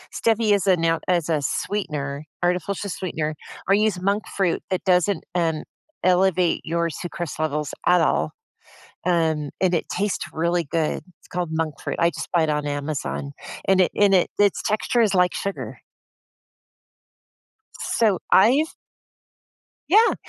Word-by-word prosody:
Stevia 225 -2 +2
is 200 - -1
a 185 -2 +5
now 165 0 +1
is 175 -3 +2
a 155 -3 +1
sweetener, 145 -5 -2 0.2
artificial 180 +3 -1
sweetener, 155 -5 -3 0.3
or 195 - +4
I - - +5
use 210 -4 +1
monk 200 +3 +1
fruit 185 -4 +1
that 185 -2 -1
doesn't, 180 -1 +2
um 165 -3 0 0.4
elevate 185 -1 +3
your 170 +1 0
sucrose 170 +1 -5
levels 150 -2 -1
at 180 0 +5
all. - - +1 0.7
Um, 160 -4 +1
and 185 -1 +3
it 165 - -2
tastes 200 +2 -1
really 170 +2 0
good. 160 -2 0 0.2
It's - - -21
called 175 -2 -3
monk 160 -1 -1
fruit; - - -3
I 170 - +4
just - - -6
buy 170 -2 +3
it 155 - 0
on 150 -1 0
Amazon, 145 -1 -3 0.3
and 190 -1 +4
it 180 - +2
and 205 -1 +5
it 180 - +3
its 205 -1 +3
texture 215 +3 +1
is 215 -3 +3
like 180 -1 +3
sugar. 200 0 -5 2.0
So, 215 -5 +1
I've 270 +11 +5 1.2
Yeah. 440 +5 +6
180 Hz, 150 wpm, -23 LUFS, 160-195 Hz, 2.0 s, Yeah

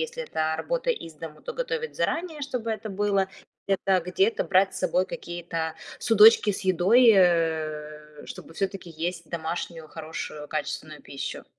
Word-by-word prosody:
Если 485 +1 -4
это 160 - -1
работа - - -1
из 165 - -4
дома, 155 0 -10
то - - -5
готовить 470 -1 -3
заранее, 330 -3 -1
чтобы 250 -5 -3
это 220 0 -5
было. 200 -1 +1 0.4
Это 195 -1 +2
где-то 185 +5 +1
брать 190 0 +3
с - - -4
собой 185 0 +1
какие-то 165 -3 -4 0.2
судочки 220 -1 +7
с - - -5
едой, 195 +7 +6
э, 155 -4 0
чтобы - - -9
всё-таки 195 -1 -3
есть 170 +1 -4
домашнюю, 165 0 -4
хорошую, 155 -2 -7
качественную 155 0 -4
пищу. 140 -1 -6
180 Hz, 145 wpm, -26 LUFS, 160-215 Hz, 0.4 s, судочки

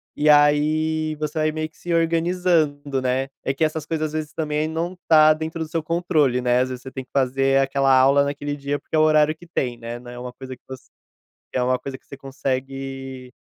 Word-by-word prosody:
e 150 - 0
aí 155 +2 +3
você 150 +1 -4
vai 155 0 +2
meio 155 0 -3
que 155 - -28
se 175 -1 -4
organizando, 165 -4 +1
né. 130 +1 -1 0.2
É 135 - 0
que 140 - -1
essas 155 0 -1
coisas 155 -1 -1
às 150 - -10
vezes 155 -1 -4
também 155 0 -1
não 170 +3 -3
tá 155 -1 +7
dentro 160 +1 -5
do 155 - -9
seu 165 -1 -2
controle, 155 -6 +1
né, 125 0 +2
às 130 - -1
vezes 125 -1 -6
você 130 - -8
tem 130 -1 -6
que - - -52
fazer 135 0 +2
aquela 135 0 +2
aula 135 +2 +5
naquele 145 0 -3
dia, 140 +1 -3
porque - - -6
é 155 - +4
o - - +5
horário 155 0 +4
que 175 +2 -16
tem, 125 -7 -2
né, 115 +1 -7
não 120 - -12
é 120 - -9
uma 125 0 -7
coisa 130 0 -9
que - - -55
voc 130 -1 -8 0.7
que - - -1
é 125 - +1
uma 125 0 +1
coisa 135 -1 -7
que - - -40
você 140 - -10
consegue, 135 -1 -5
145 Hz, 235 wpm, -22 LUFS, 135-155 Hz, 0.7 s, tá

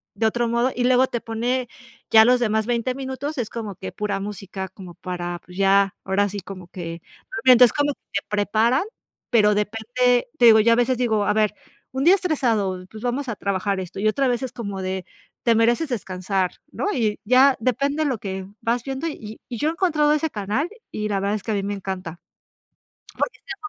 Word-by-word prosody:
de 220 +2 +2
otro 240 +1 0
modo, 240 +2 +1
y 245 - 0
luego 255 +1 +4
te 240 - -3
pone 245 +3 -1 0.4
ya 220 0 +8
los 250 +1 +4
demás 220 -1 +1
20 240 +1 0
minutos, 270 +2 -5
es 230 - -2
como 215 -4 -5
que - - -7
pura 205 -2 -2
música, 195 -1 -6
como 185 -2 -11
para, 175 -1 -5
pues, 180 +1 -13
ya, 195 0 +3
ahora 200 +2 +1
sí, 200 +1 -5
como 185 -1 -9
que. 170 -2 -7 0.4
Entonces, 250 -2 +7
como 290 0 +1
que - - -61
te 200 - 0
preparan, 220 - +2 0.5
pero 210 -3 +4
depende, 235 +4 +1
te 240 - +5
digo, 220 -1 +8
ya 230 +1 +5
a - - +4
veces 245 +1 +2
digo: 220 -4 +1
"A - - +2
ver, 215 -1 +1 0.4
un 265 +1 -2
día 360 +3 +8
estresado, 225 - 0
pues, 215 - -10
vamos 250 +2 -2
a 225 - -2
trabajar 200 0 -1
esto", 185 +1 -6
y 215 - +1
otra 270 +4 +1
vez 245 +1 0
es 260 - -4
como 200 -4 -5
de: 185 -1 -3 0.4
"Te 230 -1 +4
mereces 240 +7 +2
descansar", 190 -4 -2 0.2
¿no? - - -3
Y 220 -6 0
ya 260 +4 +5
depende 280 +6 0
lo 265 -5 0
que 190 -1 -5 0.2
vas 235 +1 0
viendo, 270 +4 -3
y, 220 -8 -7
y, 240 - -5
yo 295 - 0
he - - 0
encontrado 310 -4 +2
ese 305 +1 0
canal 215 - -2 0.2
y 210 0 -3
la 200 -1 0
verdad 200 +2 0
es 205 - -5
que 225 - -3
a - - +1
mí 200 - -1
me 205 +1 -2
encanta. 185 -4 -5 1.0
Porque - - -1
dan - - -5
220 Hz, 210 wpm, -23 LUFS, 200-255 Hz, 1.0 s, ya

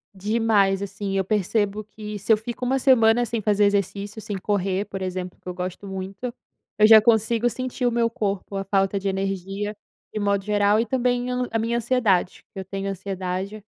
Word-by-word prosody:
Demais 205 -1 +2
assim, 200 0 -4
eu 190 - +2
percebo 210 +1 0
que 210 0 -8
se 200 +3 -1
eu 215 - +4
fico 240 +3 -5
uma 265 +2 +1
semana 240 -3 +4
sem 230 -1 -3
fazer 205 0 +3
exercício, 200 +1 -1
sem 205 -2 -4
correr, 195 0 -1
por 195 -1 -7
exemplo, 185 -1 -4
que - - -18
eu 180 - -3
gosto 185 +2 -5
muito, 195 +5 -5 0.5
eu 215 - +7
já 220 -1 +9
consigo 230 +1 +3
sentir 255 +2 -3
o 240 - +3
meu 230 0 +2
corpo, 200 -3 -3
a 195 - -2
falta 195 0 +1
de 195 - -4
energia 195 +2 -3 0.4
de 215 - -2
modo 200 -1 +1
geral 205 +1 +3
e 235 - +1
também 245 0 0
eu 250 0 -1
n - - -5
a 225 - 0
minha 235 +1 0
ansiedade, 220 -7 +1
que 195 - -7
eu 190 - -6
tenho 195 +1 -4
ansiedade, 190 +1 -4
205 Hz, 200 wpm, -24 LUFS, 195-225 Hz, 0.5 s, já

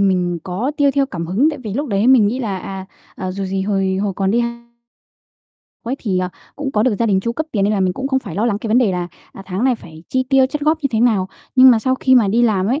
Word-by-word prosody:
mình 180 -3 +1
có 195 +9 -2
tiêu 285 -2 +3
theo 275 -1 +1
cảm 170 -9 -5
hứng, 235 - +2
tại 295 - -7
vì 215 -5 -6
lúc 285 +1 -2
đấy 200 +2 +1
mình 250 -5 +6
nghĩ 245 +5 -1
là, 205 -7 -3
à, 190 0 -7 0.3
à 185 0 -4
dù 195 +1 -4
gì 190 0 -2
hồi 195 -1 0
hồi 200 0 -1
còn 195 -1 0
đi 235 +2 +2 1.4
quấy 245 +3 -2
thì, 190 -5 -1
à, 180 0 -2 0.3
cũng 285 -1 -3
có 210 - +2
được 230 -2 +2
gia 230 - +1
đình 195 -3 +2
chu 235 +4 -2
cấp 315 +5 -3
tiền, 200 -3 +1
nên 210 - +1
là 200 - 0
mình 185 -1 +1
cũng 265 +5 -4
không 265 - +1
phải 215 - -8
lo 210 +6 0
lắng 210 -3 0
cái 225 - -5
vấn 230 +4 +4
đề 215 -7 +2
là, 175 -1 -3 0.2
à, 195 - -10
tháng 190 +5 -2
này 260 -2 +3
phải 160 -6 -13
chi 260 0 +1
tiêu 270 -1 +4
chắt 295 +3 -5
góp 310 +2 +2
như - - +2
thế 220 - +1
nào. 210 -6 +2 0.3
Nhưng 260 0 +9
mà 230 - +4
sau 260 +3 0
khi 260 0 +2
mà 230 -5 +4
đi 230 +5 +2
làm 200 -5 +2
ấy, 260 +7 0
215 Hz, 295 wpm, -18 LUFS, 190-260 Hz, 1.4 s, Nhưng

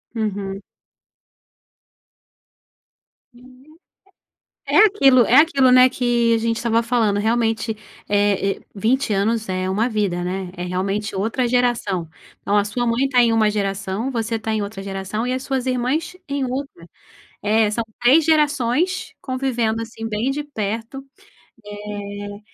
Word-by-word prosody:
Uhum. 200 -3 -3 2.7
Uhum. 255 +1 -18 1.1
É - - +4
aquilo 270 - +5
é 245 - +3
aquilo, 275 -4 +5
né, 255 0 +7
que 240 -2 +1
a - - +2
gente 230 0 -1
estava 230 0 +1
falando, 225 -4 +1
realmente, 225 0 0 0.3
eh, 205 -1 +1
e - - -18
20 235 +5 0
anos 215 +1 0
é 185 0 -1
uma 215 +6 0
vida, 200 -6 -1
né, 185 0 -4
é 175 - -7
realmente 195 +4 -2
outra 225 +6 0
geração. 235 -8 0 0.4
Ó, 200 - +1
a 205 - +4
sua 240 +4 -2
mãe 245 +4 +1
tá 250 - +3
em 230 -1 +3
uma 220 -1 +3
geração, 200 +3 -2
você 230 -2 -2
tá 220 0 -3
em 215 - 0
outra 200 -1 -6
geração 195 +3 -4
e 250 - -1
as 255 - -2
suas 265 -2 -2
irmãs 260 +8 -1
em 280 -2 -2
outra. 255 -9 -6 0.5
É, 215 0 +2
são 230 +2 -1 0.2
3 280 +6 +5
gerações 300 +2 +1
convivendo, 245 -4 -1
assim, 225 0 -7
bem 220 +5 -1
de 295 +1 -3
perto, 225 0 -5 0.7
eh, 205 0 -7
225 Hz, 145 wpm, -21 LUFS, 205-255 Hz, 2.7 s, né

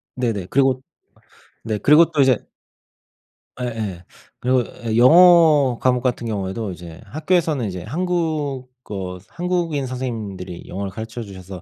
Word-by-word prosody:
네네. 115 -8 -2
그리고 135 -1 +2 0.8
네. 110 -2 -2
그리고 155 +6 +5
또 150 -3 0
이제 130 -4 +4 1.2
예예. 110 -8 -4 0.4
그리고 125 0 +2 0.2
예 110 -1 -1
영어 155 -2 +6
과목 125 -1 +2
같은 120 -2 -1
경우에도 100 0 -3
이제 85 +1 -10
학교에서는 155 - 0
이제 90 -2 -6
한국어 135 - -3
한국인 170 -5 -2
선생님들이 110 -8 -5
영어를 95 +1 -5
가르쳐 110 +4 -7
주셔서 95 -3 -10
125 Hz, 295 characters per minute, -21 LUFS, 100-150 Hz, 1.2 s, 영어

